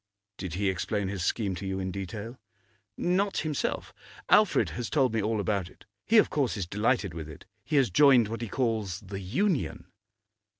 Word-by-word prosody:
'Did 90 -4 -5
he 100 +1 0
explain 95 +2 -1
his 95 -3 -3
scheme 100 0 0
to 90 - -6
you 95 0 -2
in 95 0 -3
detail?' 105 +5 -6 0.6
'Not 190 +3 +1
himself. 150 -3 -2 0.4
Alfred 210 -2 +4
has 120 -2 -4
told 130 -6 +2
me 115 - +1
all 110 +1 0
about 100 -3 -1
it. - - -20 0.2
He, 225 - +5
of 215 - +5
course, 135 -7 0
is 95 - -2
delighted 105 0 0
with 80 -1 -7
it; 75 - -12 0.2
he 155 - -3
has 135 -8 +4
joined 125 +1 +6
what 115 +2 -5
he 115 - -3
calls 110 -5 -1
the 95 0 -7
Union. 125 - -1
105 Hz, 185 wpm, -28 LUFS, 95-130 Hz, 0.6 s, joined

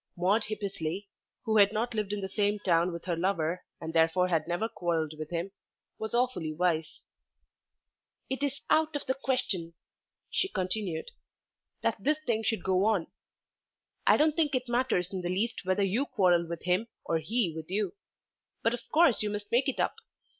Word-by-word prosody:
Maude 190 +6 +2
Hippesley, 200 -3 -4 0.3
who 220 -2 +2
had 200 -1 +7
not 230 +3 -1
lived 210 -2 -1
in 205 -1 -2
the 190 - -2
same 205 +1 +1
town 175 -3 +2
with 170 -1 -7
her 175 -2 0
lover 170 -1 0 0.2
and 160 - -5
therefore 165 +3 +3
had 160 -3 +1
never 175 +6 0
quarrelled 170 -8 -1
with 155 0 -6
him, 175 +3 -3 0.5
was 220 +1 -3
awfully 240 -11 +1
wise. 160 -1 0 1.3
"It 265 +1 -3
is 280 -1 -1
quite 310 - +6
out 315 -1 -3
of 290 - -2
the 260 - +1
question," 195 -11 -1 0.6
she - - +1
continued, 185 - -2 0.7
"that - - +1
this 300 +1 +3
thing 225 -3 +1
should 225 -4 0
go 190 0 +2
on. 210 -7 +1 1.0
I - - +7
don't 305 0 +3
think 300 -5 +2
it 255 0 -1
matters 240 -7 +1
in 185 - -2
the 175 - -2
least 200 +3 -1
whether 185 +2 +2
you 225 +9 +1
quarrel 180 -7 +3
with 170 -1 -5
him 180 +6 +1 0.2
or 165 - +1
he 195 +1 0
with 160 0 -7
you. 205 - -1 0.7
But 230 - +3
of 240 - -3
course 320 -6 +5
you 210 - 0
must 205 0 -5
make 250 +4 +3
it 270 - -3
up. - - +1
195 Hz, 185 wpm, -30 LUFS, 175-230 Hz, 1.3 s, had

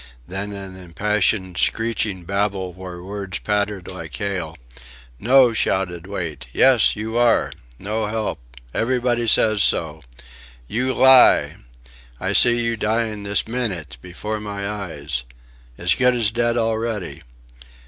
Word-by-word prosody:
Then 95 +2 -4
an 95 -2 -8
impassioned 95 +1 -1
screeching 110 -5 0
babble 100 -1 -1
where 90 -1 -9
words 100 -1 -5
pattered 105 -2 -2
like 85 -6 -7
hail. 90 -4 -3 0.6
"No!" 125 +1 +5
shouted 90 -5 -1
Wait. 85 -10 -5
"Yes. 130 - +4
You 110 +2 -4
are!... 120 -1 +3 0.3
No 105 +5 -3
help.... 105 -7 -3 0.3
Everybody 120 0 0
says 110 -2 +3
so." 80 -3 0 0.7
"You 125 - -1
lie!" 130 -1 +6 0.6
"I - - -2
see 120 0 +4
you 115 0 0
dying 110 0 -1
this 100 +1 -1
minnyt... 95 - -3
before 105 +6 -5
my 100 -1 -5
eyes... 80 -10 -4 0.5
as 90 +1 +2
good 125 -1 +3
as 115 -3 +1
dead 120 +1 0
already." 110 -9 -2
105 Hz, 125 wpm, -21 LUFS, 90-115 Hz, 0.7 s, lie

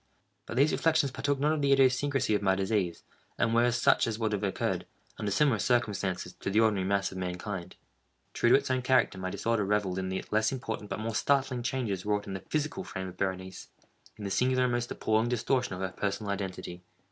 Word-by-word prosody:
But 120 - -5
these 145 +4 +5
reflections 160 -4 +2
partook 140 +2 -1
not 150 +2 +2
of 155 - -1
the 140 -1 +2
idiosyncrasy 135 -2 +3
of 105 - +1
my 95 -1 +3
disease, 95 -3 -1 0.3
and 115 - +1
were 120 +1 +4
such 120 0 +3
as 110 -2 -2
would 110 -2 -1
have 105 - -1
occurred, 100 - -1 0.3
under 105 -2 -1
similar 115 +2 +3
circumstances, 105 -7 0
to - - -3
the 105 +3 +3
ordinary 105 -4 +2
mass 100 0 +1
of 95 - -6
mankind. 90 0 -5 0.6
True 120 - +2
to - - +7
its 135 - +1
own 130 0 +1
character, 130 -6 +2
my 95 0 -3
disorder 115 +3 0
revelled 100 -2 0
in 95 0 -3
the 95 - -3
less 110 0 +2
important 110 -5 -5
but - - -3
more 110 +1 -3
startling 135 0 +1
changes 115 -7 -2
wrought 105 -1 0
in 100 - -6
the 95 - -4
physical 155 +5 -1
frame 95 - -5
of 90 - -13
Berenice—in 95 +2 -7
the 100 - -3
singular 130 +3 +2
and 125 - +1
most 120 0 -1
appalling 110 +2 +1
distortion 125 -2 0
of 90 - -7
her 95 - -1
personal 100 +2 -3
identity. 95 -3 -5
110 Hz, 210 wpm, -29 LUFS, 95-125 Hz, 0.6 s, to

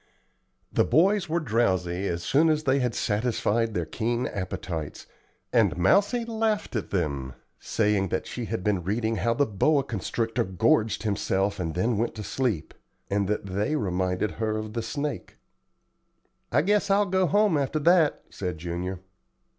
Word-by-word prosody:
The - - +4
boys 190 +2 +3
were 170 +2 +1
drowsy 95 - 0
as 85 -1 -3
soon 155 - +3
as 155 -1 +1
they 135 -1 +2
had 125 -3 -1
satisfied 115 0 0
their 85 -2 0
keen 120 +8 -1
appetites, 90 -5 -5 0.5
and - - +3
Mousie 205 - +3
laughed 220 - -1
at 110 - -2
them, 70 -8 -2 0.2
saying 105 -3 +1
that 95 - -2
she 120 - -5
had 110 -4 -3
been 100 -3 +1
reading 110 +4 -1
how 115 +6 +1
the 145 - +3
boa 140 +7 +2
constrictor 115 0 -2
gorged 110 - +1
himself 100 -1 0
and 80 -3 -3
then 105 +4 +1
went 115 0 -1
to 105 - -6
sleep, 115 - -2 0.4
and 100 -1 +1
that 105 0 -1
they 100 +10 -1
reminded 95 -3 -1
her 110 -1 -2
of 110 0 -5
the 115 - -2
snake. 140 +6 -4 1.1
"I - - +3
guess 205 +2 +2
I'll 200 +1 +4
go 190 -1 +1
home 205 -3 +3
after 140 +1 0
that," 160 0 +3
said 90 -4 -4
Junior. 90 +3 -4
110 Hz, 160 wpm, -26 LUFS, 95-145 Hz, 1.1 s, The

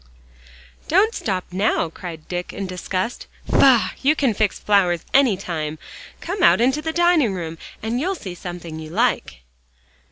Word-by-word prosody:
"Don't 400 +7 +3
stop 190 - -2
now," 195 -2 +1
cried 165 -3 -9
Dick 180 0 -4
in 195 - -4
disgust. 185 +4 -4 0.2
"Faugh! 255 -4 +4
you 290 +3 +3
can 270 -7 +1
fix 210 -1 0
flowers 180 -5 +2
any 265 -8 +4
time. 160 -5 -4 0.4
Come 375 +3 -4
out - - +6
into 265 +5 +2
the 320 +1 -2
dining 335 - +3
room 165 -2 -6 0.2
and 230 +2 -1
you'll 375 +7 -1
see 190 - -7
something 175 -2 -7
you'll 155 0 -9
like." 230 - 0
200 Hz, 155 wpm, -21 LUFS, 175-275 Hz, 0.4 s, out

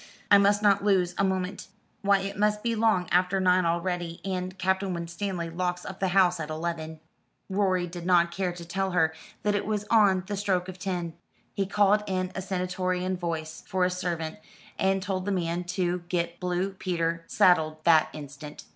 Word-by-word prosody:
I 200 - +9
must 205 +1 +3
not 200 -1 +4
lose 185 -4 +2
a - - +4
moment. 190 0 -2 0.3
Why 200 -1 +3
it 200 +1 -4
must 210 +1 +1
be 235 -1 +1
long 220 -5 +2
after 180 +2 +3
nine 185 -1 +3
already, 170 0 -2
and 185 0 -3
Captain 190 0 0
Winstanley 170 0 -4
locks 180 +1 -2
up 190 - -7
the 195 - +1
house 180 -2 +3
at 155 -1 -4
eleven." 160 0 -4 0.5
Rorie 190 -2 +1
did 175 0 -8
not 170 -1 +3
care 185 0 -1
to 175 -1 -9
tell 190 +2 -2
her 160 -3 +3 0.3
that 210 - +2
it 205 - 0
was 210 -1 -1
on 200 -5 +5
the 205 +1 -3
stroke 190 -3 0
of 185 0 -8
ten. 180 -4 -3 0.4
He 195 -1 -1
called 205 +1 +3
in 185 -1 -1
a 190 - -4
stentorian 185 0 -1
voice 160 -3 -4
for 185 -2 +1
a 180 - 0
servant, 175 -1 -3 0.4
and 190 0 +1
told 185 -1 -2
the 205 - -1
man 175 -1 -1
to 180 0 -1
get 170 -1 -1
Blue 180 +1 -1
Peter 170 -3 -2
saddled 155 -4 +3
that 160 -2 +5
instant. 145 0 -9
185 Hz, 185 wpm, -27 LUFS, 170-195 Hz, 0.5 s, I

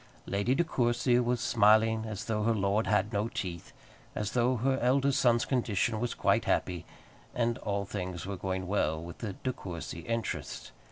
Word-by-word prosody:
Lady 100 +6 +1
De 170 - +3
Courcy 120 -4 +2
was 120 0 +1
smiling 110 0 +4
as 110 -1 -5
though 110 -2 -1
her 115 +1 +2
lord 100 +2 +1
had 105 +1 +1
no 105 +2 +1
teeth, 90 -6 -5 0.4
as 105 -1 -2
though 125 +1 +2
her 130 +3 +1
eldest 135 +2 +3
son's 120 -3 +4
condition 115 -3 0
was 120 0 -2
quite - - +2
happy, 90 -2 -1 0.5
and 120 0 0
all 100 -1 -2
things 90 -4 -5
were 100 +1 -4
going 95 0 -3
well 85 -5 0
with 85 +1 -9
the 105 -4 -4
De 130 +6 -3
Courcy 85 -6 -6
interests. 115 +6 -4
110 Hz, 175 wpm, -30 LUFS, 100-120 Hz, 0.5 s, smiling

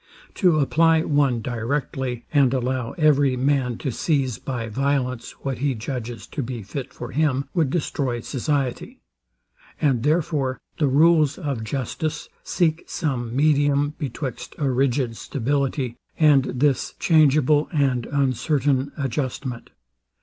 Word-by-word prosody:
To 180 -6 +3
apply 160 +2 +3
one 140 -7 +1
directly, 125 0 -3
and 135 -3 +4
allow 125 -1 -2
every 145 -5 +3
man 130 -3 +1
to 135 - -3
seize 135 -3 0
by 120 -4 -4
violence 125 0 -1
what 135 -3 -3
he 140 -1 0
judges 115 -2 -5
to 145 - -5
be 120 -3 -5
fit 130 +7 -6
for 120 - -8
him, 140 -2 +1
would 165 -7 +2
destroy 135 -5 -1
society; 135 0 -2 0.8
and 135 -6 +2
therefore 150 -3 0 0.2
the 150 - +3
rules 155 +1 +4
of 140 -10 -3
justice 140 +6 -3
seek 165 -2 0
some 125 -6 -3
medium 145 0 +2
betwixt 130 -2 -5
a 140 -3 0
rigid 125 -2 0
stability, 135 -1 -2 0.2
and 145 -4 +5
this 135 +1 0
changeable 150 -2 +4
and 135 -6 +1
uncertain 140 0 +1
adjustment. 130 -2 -3
135 Hz, 125 wpm, -23 LUFS, 125-150 Hz, 0.8 s, and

